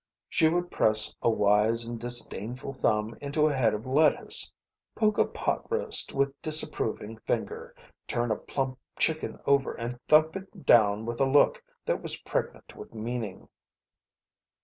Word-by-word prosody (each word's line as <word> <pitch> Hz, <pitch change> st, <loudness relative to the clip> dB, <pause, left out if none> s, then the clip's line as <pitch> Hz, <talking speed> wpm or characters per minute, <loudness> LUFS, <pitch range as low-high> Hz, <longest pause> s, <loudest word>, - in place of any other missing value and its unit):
She 160 Hz, -, +2 dB
would 175 Hz, +1 st, -2 dB
press 110 Hz, 0 st, +4 dB
a -, -, +2 dB
wise 110 Hz, +2 st, +2 dB
and 120 Hz, 0 st, -6 dB
disdainful 120 Hz, +1 st, +1 dB
thumb 110 Hz, -3 st, -1 dB
into 145 Hz, +2 st, 0 dB
a 155 Hz, -, +1 dB
head 120 Hz, -5 st, +1 dB
of 105 Hz, -, -8 dB
lettuce; 150 Hz, +4 st, +3 dB, 0.4 s
poke 215 Hz, -1 st, +1 dB
a -, -, +4 dB
pot -, -, -4 dB
roast 460 Hz, -1 st, +2 dB
with 140 Hz, 0 st, -2 dB
disapproving 115 Hz, -8 st, 0 dB
finger; -, -, -4 dB, 0.3 s
turn 120 Hz, -1 st, -2 dB
a -, -, +1 dB
plump 130 Hz, +1 st, -4 dB, 0.2 s
chicken 160 Hz, -1 st, -1 dB
over 140 Hz, -1 st, +1 dB
and 120 Hz, +1 st, -6 dB
thump 155 Hz, +2 st, +4 dB
it 195 Hz, -1 st, -10 dB
down 105 Hz, -1 st, +4 dB
with 120 Hz, +2 st, -4 dB
a 135 Hz, -, +2 dB
look 145 Hz, +2 st, +3 dB, 0.2 s
that -, -, -1 dB
was -, -, -2 dB
pregnant -, -, -5 dB
with -, -, -12 dB
meaning. 110 Hz, -3 st, -6 dB
125 Hz, 150 wpm, -27 LUFS, 110-150 Hz, 0.4 s, press